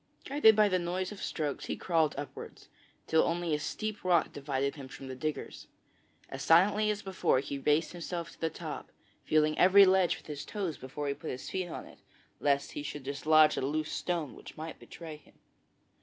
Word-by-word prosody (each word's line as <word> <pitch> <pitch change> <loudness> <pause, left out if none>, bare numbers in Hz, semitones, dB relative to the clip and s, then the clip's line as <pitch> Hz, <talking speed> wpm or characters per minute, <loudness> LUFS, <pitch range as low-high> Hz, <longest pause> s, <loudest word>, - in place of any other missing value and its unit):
Guided 265 -6 +5
by 210 0 +5
the 185 -2 +1
noise 180 +2 -2
of 205 - -8
the - - -7
strokes 150 -3 -3
he - - -3
crawled 160 -4 +1
upwards, 145 -1 -8 0.4
till 160 - +4
only 170 -1 0
a 150 - +1
steep 215 +7 -4
rock 175 -3 +2
divided 140 -1 -1
him 140 -3 -8
from 135 +1 -10
the 130 - -6
diggers. 155 +3 -5 0.6
As - - -7
silently 205 +6 +4
as 210 -1 -2
before 190 -8 +1
he 140 +1 -4
raised 150 +4 +2
himself 170 -1 -5
to - - -19
the 165 - +1
top, - - -7 0.3
feeling 155 0 +2
every 195 +2 +8
ledge 190 -2 +3
with - - -17
his 145 -2 -6
toes 190 -8 -4
before 140 +3 -5
he 140 - 0
put 155 - -8
his 130 - -6
feet 185 -1 -2
on - - -6
it, - - -16 0.4
lest 140 -1 +1
he - - -5
should 145 -1 -6
dislodge 155 +3 +4
a - - 0
loose 155 +3 -1
stone 170 -6 -2
which - - -12
might 160 +1 -7
betray 160 -2 -9
him. 150 - -24
160 Hz, 200 wpm, -31 LUFS, 145-185 Hz, 0.6 s, every